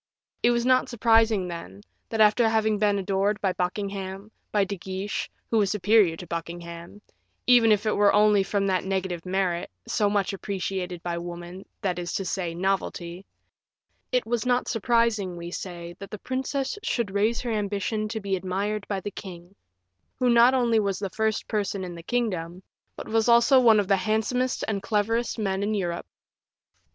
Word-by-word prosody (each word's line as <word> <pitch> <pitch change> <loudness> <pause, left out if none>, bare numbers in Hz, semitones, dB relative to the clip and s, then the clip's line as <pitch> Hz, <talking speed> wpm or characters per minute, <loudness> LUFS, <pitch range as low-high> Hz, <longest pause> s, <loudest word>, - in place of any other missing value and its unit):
It 240 - +4
was 235 0 +1
not 255 0 +3
surprising, 225 -4 +3
then, 170 +3 -8 0.3
that, 225 - -3
after 220 +2 +5
having 220 -1 +1
been 205 -1 +2
adored 200 +1 0
by 190 -2 0
Buckingham, 195 +2 -4 0.2
by 205 -1 +3
De 200 +1 -4
Guiche, 190 +2 -4 0.2
who 225 - +3
was 200 -2 +2
superior 205 -4 +3
to 180 - -8
Buckingham, 170 +3 -7 0.4
even 240 -3 +6
if 210 0 +2
it 215 - +1
were 205 0 +5
only 210 -1 +5
from 200 +1 0
that 185 -2 +1
negative 190 -2 -3
merit, 180 -2 -1 0.2
so 205 -1 +1
much 200 -1 0
appreciated 190 -3 -4
by 170 -1 -2
women, 175 +2 -8
that 180 -3 -1
is 175 0 -4
to 195 - -2
say, 175 -2 -2
novelty 185 -1 -2 0.8
it 250 -2 +1
was 230 0 -1
not 250 0 +1
surprising, 225 -5 +1
we 170 0 -7
say, 175 -2 -6
that 200 0 -8
the 210 - -6
princess 265 - -3
should 235 - -1
raise 215 +4 +1
her 240 - -3
ambition 210 +1 -1
to 220 +1 -4
being 195 -2 -1
admired 200 +3 -3
by 195 -2 -2
the 205 - -5
king, 180 -1 -10 0.6
who 250 -1 +2
not 235 +2 +6
only 235 -3 +3
was 200 -2 0
the 195 -2 -4
first 220 -1 -1
person 200 -3 -2
in 180 -1 -6
the 170 - -9
kingdom, 185 -5 -2 0.3
but - - -8
was 225 0 +1 0.2
one 240 -5 +7
of 200 - 0
the 195 -1 +4
handsomest 220 +5 0
and 200 -3 -1
cleverest 225 +4 0
men 195 -3 -1
in 210 +2 0
Europe. 175 -4 -3
200 Hz, 175 wpm, -26 LUFS, 185-220 Hz, 0.8 s, one